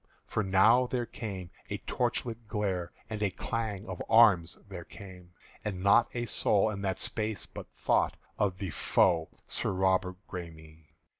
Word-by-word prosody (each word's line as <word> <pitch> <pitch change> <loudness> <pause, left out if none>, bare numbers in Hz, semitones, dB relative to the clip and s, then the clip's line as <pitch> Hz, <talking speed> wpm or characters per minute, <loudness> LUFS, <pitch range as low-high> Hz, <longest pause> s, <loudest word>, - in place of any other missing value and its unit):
For 110 - -1
now 110 +6 +5
there 120 -1 -1
came 95 -7 -6 0.2
a - - -2
torchlight 115 -1 -2
glare, 95 -5 -2 0.2
And 110 -1 -5
a 105 - +2
clang 105 +1 -3
of 95 -3 -5
arms 105 -7 +6
there 90 -3 -7
came; 90 -2 -12 0.3
And 95 -3 -3
not 100 +4 +5
a 120 0 -1
soul 105 -1 +2
in 100 -2 -5
that 95 -2 -1
space 110 0 -1
but - - -9
thought - - +1 0.2
Of 95 -3 +1
the 95 -3 -4
foe 80 +2 +2 0.2
Sir - - -1
Robert 95 -1 +1
Græme. 80 -3 -9
95 Hz, 155 wpm, -30 LUFS, 90-110 Hz, 0.3 s, arms